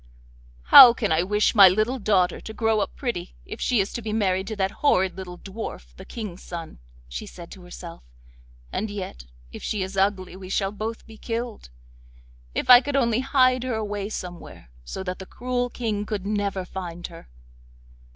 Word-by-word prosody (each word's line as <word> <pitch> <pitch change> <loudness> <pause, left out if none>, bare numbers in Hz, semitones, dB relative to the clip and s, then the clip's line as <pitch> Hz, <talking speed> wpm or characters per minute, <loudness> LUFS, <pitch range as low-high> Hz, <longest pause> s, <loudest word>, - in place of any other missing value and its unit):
'How 235 - +10
can 215 -7 -1
I 160 +1 +3
wish 210 +3 +1
my 200 -4 +9
little 215 +7 0
daughter 190 -4 +1
to 220 - -8
grow 225 -1 +1
up 205 - -3
pretty 190 -9 -4
if 215 - -8
she 245 -4 +2
is 195 +1 -1
to 235 - -4
be 220 -1 -4
married 195 -3 0
to 220 - -4
that 195 -1 0
horrid 190 -10 +3
little 180 -2 -8
dwarf, 190 - -8
the - - -11
King's 210 -6 -7
son,' 165 - -8 0.3
she - - -7
said 170 -1 -11
to 190 - -11
herself, 175 -1 -10 0.7
'and 215 - -2
yet, 185 - -7 0.3
if - - -9
she 205 -3 -2
is 190 +1 -6
ugly 190 -1 0
we 185 -1 -10
shall 195 0 0
both 220 +2 -5
be 220 -1 -14
killed. 230 - -5 0.9
If - - -1
I 250 -1 +10
could 280 +1 -3
only 235 -4 +2
hide 255 -1 +3
her 250 -2 -2
away 205 -2 -3
somewhere, 175 - -8
so 125 - -6
that 185 -1 -5
the 190 - -9
cruel 245 0 -2
King 215 -4 -3
could 205 -3 -4
never 200 -2 -2
find 175 -2 -7
her. 165 - -11
200 Hz, 190 wpm, -24 LUFS, 185-225 Hz, 0.9 s, How